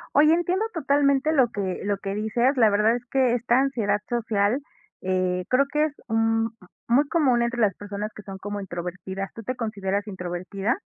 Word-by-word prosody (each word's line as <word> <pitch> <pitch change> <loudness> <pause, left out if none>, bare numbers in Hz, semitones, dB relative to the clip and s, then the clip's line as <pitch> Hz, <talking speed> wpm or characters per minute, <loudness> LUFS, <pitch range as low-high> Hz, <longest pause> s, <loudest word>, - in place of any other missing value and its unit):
Oye, 305 +2 +6
entiendo 355 +5 +1
totalmente 280 -1 +2
lo 260 -5 +4
que 190 -4 -3
lo 200 -1 0
que 195 0 -4
dices, 235 +6 +1
la 225 -3 +6
verdad 215 +3 +3
es 245 0 -6
que 255 -3 +3
esta 240 +1 +2
ansiedad 220 -7 +1
social, 225 0 +1 0.4
eh, 185 -1 0
creo 270 +2 +4
que 300 0 +2
es, 300 - -4
mm, 225 0 +2 0.4
muy 275 +5 +3
común 260 -8 +3
entre 240 0 -2
las 200 -4 +3
personas 205 +1 -5
que 210 - -10
son 195 -1 -8
como 205 +1 -4
introvertidas. 185 +1 -5
¿Tú 225 - -8
te 255 +4 -3
consideras 205 -3 -2
introvertida? 190 - -3
225 Hz, 180 wpm, -25 LUFS, 200-260 Hz, 0.4 s, Oye